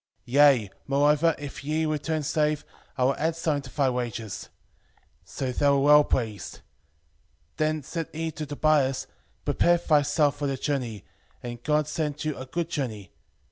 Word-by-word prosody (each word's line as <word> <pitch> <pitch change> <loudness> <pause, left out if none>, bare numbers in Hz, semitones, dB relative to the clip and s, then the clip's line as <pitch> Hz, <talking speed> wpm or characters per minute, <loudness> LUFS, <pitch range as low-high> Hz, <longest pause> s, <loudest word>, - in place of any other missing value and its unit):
5:15 120 - -10
Yea, 135 -8 +5 0.2
moreover, 150 +3 +3
if 145 -1 -8
ye 155 +2 0
return 155 0 -1
safe, 150 +1 0 0.3
I 130 - +1
will 135 +2 +3
add 160 +1 0
something 155 -3 0
to - - -19
thy 140 -2 +3
wages. 115 -4 -4 0.8
5:16 - - -21
So 130 -2 -3
they 140 +3 +2
were 140 0 +4
well 150 +1 +7
pleased. 110 - -3 1.0
Then 155 -1 0
said 165 +3 -4
he 160 +1 -3
to 155 0 -6
Tobias, 145 -2 +1 0.4
Prepare 175 0 +3
thyself 150 -2 +2
for 145 0 -2
the 135 -1 -2
journey, 120 - -3 0.4
and 120 -1 -6
God 150 +2 +1
send 150 -1 -3
you 155 -2 -1
a 130 - -8
good 170 +4 -3
journey. 110 - -4
145 Hz, 165 wpm, -26 LUFS, 130-155 Hz, 1.0 s, well